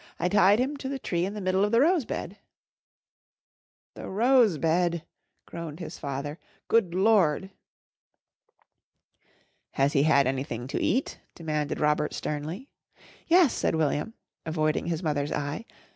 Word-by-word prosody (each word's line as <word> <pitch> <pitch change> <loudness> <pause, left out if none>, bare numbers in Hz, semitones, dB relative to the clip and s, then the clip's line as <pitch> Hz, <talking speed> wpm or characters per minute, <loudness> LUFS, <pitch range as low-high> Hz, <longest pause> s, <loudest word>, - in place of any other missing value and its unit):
"I 180 - 0
tied 200 0 +5
him 270 +4 -1
to 270 -1 -5
the 275 - -3
tree 175 -8 -1
in 200 - -6
the 210 - -5
middle 185 +1 +1
of 205 - +1
the 230 - +4
rose 320 0 +3
bed." - - -6 1.5
"The - - -8
rose 230 - +3
bed!" 170 +1 0 0.4
groaned 165 -2 -7
his 170 -1 -7
father. 140 +3 -5 0.3
"Good 195 -7 +2
Lord!" 190 -3 +3 2.2
"Has 140 +2 +1
he 140 - +3
had 140 -2 +4
anything 130 -2 -3
to - - -2
eat?" 260 +6 0 0.2
demanded 150 -3 -3
Robert 150 0 +1
sternly. 155 - -5 0.6
"Yes," 345 -5 +5
said - - 0
William, 160 +7 -1 0.3
avoiding 155 0 -1
his 170 +1 -2
mother's 145 -2 -1
eye. 145 +9 -3
170 Hz, 140 wpm, -27 LUFS, 150-210 Hz, 2.2 s, tied